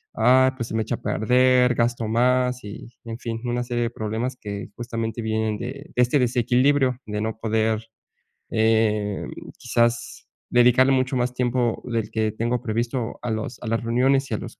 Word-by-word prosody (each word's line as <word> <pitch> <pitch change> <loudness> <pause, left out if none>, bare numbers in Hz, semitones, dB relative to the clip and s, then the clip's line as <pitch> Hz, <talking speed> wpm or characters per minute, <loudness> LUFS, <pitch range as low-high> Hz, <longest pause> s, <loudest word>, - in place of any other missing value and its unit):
ah, 130 +1 +4
pues 115 -3 -3
se - - -5
me 110 - +1
echa - - -2
a - - -13
perder, 125 +2 +3
gasto 120 -1 0
más", 125 +2 +2
y 105 +3 -9 0.2
en 115 0 -6
fin, 115 -2 -4
una 120 0 -1
serie 120 0 -2
de 115 - 0
problemas 115 +3 -3
que 100 -4 -7
justamente 115 -1 -4
vienen 110 -1 -1
de 120 - -5 0.3
de 125 - +3
este 125 +4 +3
desequilibrio, 125 +2 +2
de 105 0 -3
no 110 0 -3
poder, 110 0 0 0.7
eh, 110 -2 +1 0.3
quizás 120 0 -1 0.2
dedicarle 125 +2 +5
mucho 130 0 +1
más 125 0 0
tiempo 125 -2 0
del 115 -3 -2
que 110 -1 0
tengo 120 +3 -1
previsto 120 +1 -2
a 120 - -3
los 110 +3 -4
a 120 - -6
las 115 +1 -1
reuniones 130 +4 +2
y - - 0
a - - -2
los - - -9
120 Hz, 180 wpm, -23 LUFS, 110-125 Hz, 0.7 s, dedicarle